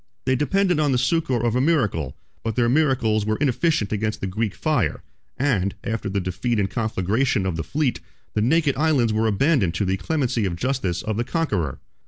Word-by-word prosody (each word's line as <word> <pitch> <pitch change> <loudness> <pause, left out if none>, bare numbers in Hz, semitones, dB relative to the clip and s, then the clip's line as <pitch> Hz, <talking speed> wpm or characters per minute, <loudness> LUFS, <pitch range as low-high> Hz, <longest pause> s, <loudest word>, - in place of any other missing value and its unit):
They 130 0 +2
depended 180 +5 +1
on 150 -2 +2
the 130 - +2
succor 130 -2 +1
of 120 0 +1
a 125 - +2
miracle: 110 - 0 0.3
but 115 -2 -2
their 120 -1 +2
miracles 125 -6 +2
were 110 +1 0
inefficient 145 -4 +1
against 110 +1 -1
the - - -3
Greek 105 +2 -2
fire; - - 0 0.3
and, 105 -9 +1
after 110 -2 -3
the 100 +1 -1
defeat 95 +6 -2
and 100 - +1
conflagration 110 0 0
of 95 -3 -1
the 80 - -3
fleet, 145 - -1 0.3
the 105 - 0
naked 145 +4 +2
islands 140 -7 +2
were 110 +1 +1
abandoned 110 - +2
to 100 - 0
the 95 +1 0
clemency 125 -5 0
or 85 - -3
justice 95 -6 -1
of 110 -1 -2
the 120 - +1
conqueror. 120 - -1
115 Hz, 195 wpm, -23 LUFS, 100-140 Hz, 0.3 s, They